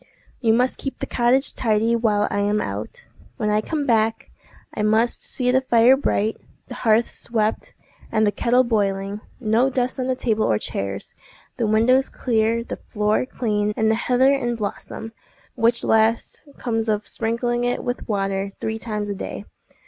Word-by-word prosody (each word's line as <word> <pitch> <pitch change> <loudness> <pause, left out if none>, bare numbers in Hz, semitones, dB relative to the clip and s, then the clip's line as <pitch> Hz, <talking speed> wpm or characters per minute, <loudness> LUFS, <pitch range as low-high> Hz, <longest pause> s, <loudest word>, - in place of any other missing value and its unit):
"You 225 -3 +2
must 250 +3 +2
keep 270 - -5
the - - -4
cottage 250 +3 +1
tidy 225 0 +1
while 215 -3 +1
I 205 - 0
am 205 +1 +1
out. 485 - -5 0.3
When 210 -2 0
I 210 0 +2
come 295 +4 -2
back, 225 -2 +1 0.4
I - - -3
must 220 +3 +2
see 250 -1 -1
the 260 +1 +3
fire 240 0 +5
bright, 220 -5 0 0.3
the - - -6
hearth 225 0 +2
swept, 220 -2 -2 0.4
and 220 0 +2
the 205 - +2
kettle 240 +5 +2
boiling; 200 -3 -1 0.2
no 235 +2 +2
dust 255 0 -1
on 255 - -1
the 260 - +1
table 220 -4 0
or 110 - +2
chairs, 100 -1 -4 0.4
the 230 - 0
windows 245 +5 +3
clear, 230 -1 0
the - - -6
floor 210 +3 -1
clean, 210 -4 -1
and 220 0 +3
the 220 +1 0
heather 260 +2 +5
in 245 -4 -1
blossom—which 225 +2 -3
last 225 +6 +1
comes 225 -2 -1
of 210 -1 -1
sprinkling 240 +1 -1
it 245 0 -1
with 245 -1 -4
water 195 -1 -1
three 220 0 -3
times 210 -2 -4
a 205 - -2
day. 195 - -6
225 Hz, 170 wpm, -22 LUFS, 210-245 Hz, 0.4 s, fire